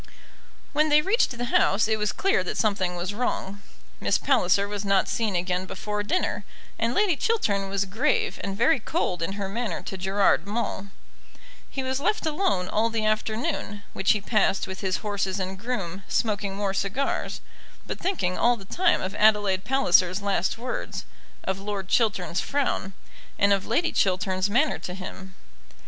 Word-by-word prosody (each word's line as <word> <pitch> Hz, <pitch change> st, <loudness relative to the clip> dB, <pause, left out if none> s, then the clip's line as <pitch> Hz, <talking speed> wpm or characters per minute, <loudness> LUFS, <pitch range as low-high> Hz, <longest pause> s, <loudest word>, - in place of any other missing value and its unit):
When 305 Hz, +2 st, +3 dB
they 300 Hz, 0 st, +5 dB
reached 435 Hz, +7 st, +3 dB
the 245 Hz, -, -2 dB
house 205 Hz, +2 st, +4 dB
it 220 Hz, -1 st, +1 dB
was 210 Hz, 0 st, +1 dB
clear 390 Hz, -, +1 dB
that 180 Hz, -, -4 dB
something 195 Hz, -4 st, +1 dB
was 175 Hz, +3 st, -3 dB
wrong. 205 Hz, -3 st, -2 dB, 0.4 s
Miss -, -, +2 dB
Palliser 200 Hz, -7 st, +2 dB
was 205 Hz, 0 st, -4 dB
not 195 Hz, -1 st, +2 dB
seen 220 Hz, -4 st, -1 dB
again 180 Hz, +1 st, -1 dB
before 210 Hz, +2 st, -3 dB
dinner, 285 Hz, -, -1 dB, 0.4 s
and 230 Hz, +2 st, 0 dB
Lady 405 Hz, -5 st, +3 dB
Chiltern 205 Hz, -, 0 dB
was 200 Hz, 0 st, 0 dB
grave 300 Hz, -, 0 dB
and 195 Hz, 0 st, -3 dB
very 275 Hz, +6 st, +4 dB
cold 215 Hz, -, -1 dB
in 165 Hz, +4 st, -1 dB
her 200 Hz, -1 st, -3 dB
manner 200 Hz, -3 st, -3 dB
to 190 Hz, -, -6 dB
Gerard 195 Hz, +1 st, +2 dB
Maule. 205 Hz, -2 st, -2 dB, 0.8 s
He 265 Hz, -, -3 dB
was 260 Hz, +1 st, -1 dB
left 420 Hz, +7 st, 0 dB
alone 300 Hz, -, 0 dB
all 220 Hz, +4 st, +1 dB
the 225 Hz, -1 st, -1 dB
afternoon, 215 Hz, -1 st, -1 dB
which 195 Hz, -, +3 dB
he 210 Hz, -, -2 dB
passed 205 Hz, -2 st, +2 dB
with 190 Hz, 0 st, -7 dB
his 190 Hz, -1 st, 0 dB
horses 195 Hz, -2 st, -1 dB
and 190 Hz, 0 st, -4 dB
groom, 200 Hz, -6 st, -3 dB
smoking 205 Hz, -3 st, -1 dB
more 200 Hz, -1 st, -1 dB
cigars, 200 Hz, +8 st, -1 dB, 0.5 s
but -, -, -5 dB
thinking 335 Hz, -, -1 dB
all 240 Hz, 0 st, +4 dB
the 195 Hz, -, -12 dB
time 360 Hz, -, +2 dB
of 190 Hz, +1 st, -3 dB
Adelaide 205 Hz, -3 st, +3 dB
Palliser's 185 Hz, -8 st, +3 dB
last 195 Hz, -1 st, 0 dB
words, 250 Hz, +2 st, -4 dB, 0.4 s
of 190 Hz, 0 st, -2 dB
Lord 200 Hz, -1 st, -4 dB
Chiltern's 195 Hz, -6 st, +1 dB
frown, 270 Hz, -9 st, -1 dB, 0.4 s
and 200 Hz, 0 st, +4 dB
of 195 Hz, -1 st, -1 dB
Lady 325 Hz, +9 st, +1 dB
Chiltern's 185 Hz, 0 st, +1 dB
manner 275 Hz, +8 st, +2 dB
to 180 Hz, -, -6 dB
him. 190 Hz, 0 st, -8 dB
205 Hz, 170 wpm, -26 LUFS, 190-240 Hz, 0.8 s, they